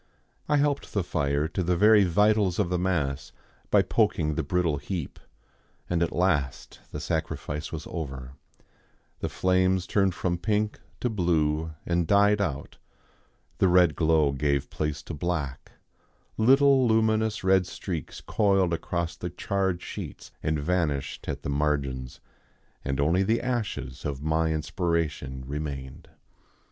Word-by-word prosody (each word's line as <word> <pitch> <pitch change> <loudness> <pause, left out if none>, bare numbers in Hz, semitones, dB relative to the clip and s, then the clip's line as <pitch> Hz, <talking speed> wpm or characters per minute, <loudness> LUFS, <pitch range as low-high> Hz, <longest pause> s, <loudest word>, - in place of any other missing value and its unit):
I 150 - +4
helped 145 -1 0
the 100 - +1
fire 70 -3 0
to 95 - -2
the 90 0 +1
very 105 +1 +6
vitals 105 0 +3
of 100 -5 +1
the 90 - +1
mass 80 -7 -1 0.4
by - - +5
poking 75 -1 +1
the - - -1
brittle 85 0 0
heap, 80 +1 -5 0.7
and 85 -1 0
at 85 - +1
last 75 -7 -1
the - - -6
sacrifice 75 +1 -3
was 80 -2 -5
over, 65 -6 -6 0.9
the - - -2
flames 95 0 +2
turned 95 -2 +1
from 90 -2 -1
pink 105 +4 0 0.2
to 125 - +1
blue 80 -5 0
and 85 -1 0
died 100 +2 +4
out, 70 -9 -4 0.8
the 95 - +4
red 90 -3 +5
glow 80 -3 +3
gave 70 0 -1
place 75 -1 -3
to - - -7
black, 75 -4 -3 0.6
little 135 +2 +5
luminous 110 -1 +2
red 95 -1 +3
streaks 85 -5 -6
coiled 95 -4 +2
across 85 0 -2
the 90 +1 -5
charred 95 0 -1
sheets - - -7
and 75 0 0
vanished 75 -3 -1
at - - -4
the - - -3
margins, 70 -3 -1 0.6
and 70 0 -2
only 80 +6 +3
the 110 +4 +2
ashes 105 - -3
of 70 -1 -4
my 80 +1 +1
inspiration 80 -4 -2
remained. 70 -2 -6
85 Hz, 140 wpm, -27 LUFS, 75-95 Hz, 0.9 s, very